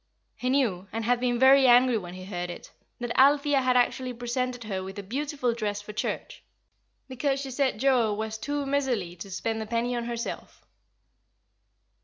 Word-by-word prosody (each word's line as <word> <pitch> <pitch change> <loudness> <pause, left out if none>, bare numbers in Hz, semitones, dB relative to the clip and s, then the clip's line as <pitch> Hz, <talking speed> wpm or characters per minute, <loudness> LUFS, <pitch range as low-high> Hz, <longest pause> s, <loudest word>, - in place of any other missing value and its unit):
He 255 - -2
knew, 225 -9 +1
and 225 0 -3
had 245 +1 +2
been 245 -1 0
very 265 +1 +6
angry 245 0 +6
when 180 -4 -4
he 185 0 -9
heard 180 -2 -4
it, 175 - -9 0.3
that 240 -1 -3
Althea 285 +1 +5
had 255 -1 +3
actually 250 +1 +1
presented 245 +1 -3
her 195 -4 -3
with 190 +2 -8
a 200 - -5
beautiful 265 +3 -2
dress, 210 -3 -2
for 210 +1 -9
church; - - -4 0.7
because 270 +1 -1
she 270 -1 -5
said 260 -3 0
Joa 250 -4 +3
was 220 0 -4
too 290 +2 -2
miserly 255 -11 -1
to 195 - -8
spend 220 +4 -3
a 220 - -5
penny 235 +2 -1
on 235 -1 -2
herself. 235 0 -6
240 Hz, 180 wpm, -27 LUFS, 215-265 Hz, 0.7 s, very